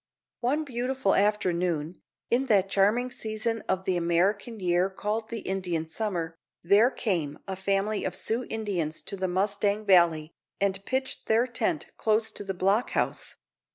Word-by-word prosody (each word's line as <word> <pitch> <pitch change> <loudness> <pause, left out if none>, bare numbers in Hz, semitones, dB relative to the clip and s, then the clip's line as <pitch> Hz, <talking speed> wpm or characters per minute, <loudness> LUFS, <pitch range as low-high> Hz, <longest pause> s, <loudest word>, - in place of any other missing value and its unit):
One 280 +6 +1
beautiful 255 -5 0
afternoon, 180 -5 0 0.3
in 255 +3 +2
that 195 -4 +3
charming 215 +6 +2
season 220 0 -2
of 190 0 0
the 185 -2 +1
American 195 +6 +1
year 180 0 +2
called 215 +3 -3
the 230 -2 -4
Indian 180 -4 -2
summer, 165 -3 -3 0.2
there 200 +7 +5
came 170 - -2
a 190 - -3
family 195 +2 0
of - - -2
Sioux 235 +3 -1
Indians 190 -8 -2
to 200 - -3
the 190 -1 -1
Mustang 200 +3 0
Valley, 170 -4 +4 0.3
and 195 -1 0
pitched 265 +1 -1
their 225 +2 +4
tent 255 +6 -2
close 220 0 +1
to - - -3
the 195 -1 -4
block 195 +6 +2
house. - - -1
200 Hz, 155 wpm, -27 LUFS, 180-225 Hz, 0.3 s, there